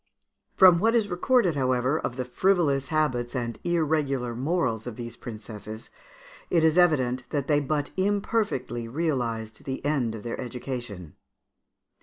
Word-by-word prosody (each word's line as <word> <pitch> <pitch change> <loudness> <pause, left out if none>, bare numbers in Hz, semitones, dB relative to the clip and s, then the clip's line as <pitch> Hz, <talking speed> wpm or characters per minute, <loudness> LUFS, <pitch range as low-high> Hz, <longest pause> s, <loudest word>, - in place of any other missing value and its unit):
From 180 -3 +8
what 225 +5 +3
is 220 -3 +2
recorded, 180 - +2
however, 130 +2 +1
of 125 - -3
the 125 -1 -3
frivolous 145 -2 +1
habits 130 -6 0
and 120 -2 -3
irregular 150 -7 0
morals 130 -5 -1
of 120 - -5
these 120 0 -7
princesses, 110 -2 -9 0.6
it 165 -2 +3
is 160 -1 +4
evident 130 -8 +2
that 140 -3 -1
they 145 -1 +3
but 145 0 -2
imperfectly 195 - -1
realised 115 -6 -2
the 135 0 -5
end 130 -7 0
of 105 - -8
their 120 - -4
education. 120 - -6
135 Hz, 140 wpm, -26 LUFS, 120-165 Hz, 0.6 s, From